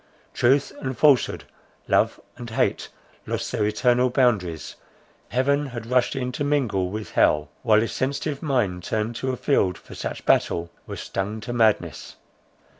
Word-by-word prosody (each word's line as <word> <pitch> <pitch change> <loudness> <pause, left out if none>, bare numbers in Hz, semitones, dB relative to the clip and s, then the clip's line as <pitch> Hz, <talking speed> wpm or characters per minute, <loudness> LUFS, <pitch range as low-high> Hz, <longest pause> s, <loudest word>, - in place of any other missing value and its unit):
Truth 135 +4 +3
and 130 -2 -4
falsehood, 145 -2 +3 0.4
love - - +2 0.2
and 120 -1 -8
hate 115 - 0 0.4
lost - - -3
their 110 -4 +1
eternal 125 +3 +2
boundaries, 105 - 0 0.5
heaven 140 +3 +1 0.2
rushed 125 +1 +1
in 125 -1 -2
to 135 - -3
mingle 125 -11 0
with 105 +2 -6
hell; 75 0 +3
while 110 -2 +4
his 115 - -2
sensitive 140 +2 -2
mind, 115 - 0
turned 110 +5 -2
to 130 - -1
a 130 - -4
field 95 -11 +1
for - - -14
such - - -5
battle, 85 0 +2 0.2
was - - -6
stung 105 +3 -3
to 120 - -5
madness. 110 -3 +1
120 Hz, 150 wpm, -24 LUFS, 105-130 Hz, 0.5 s, while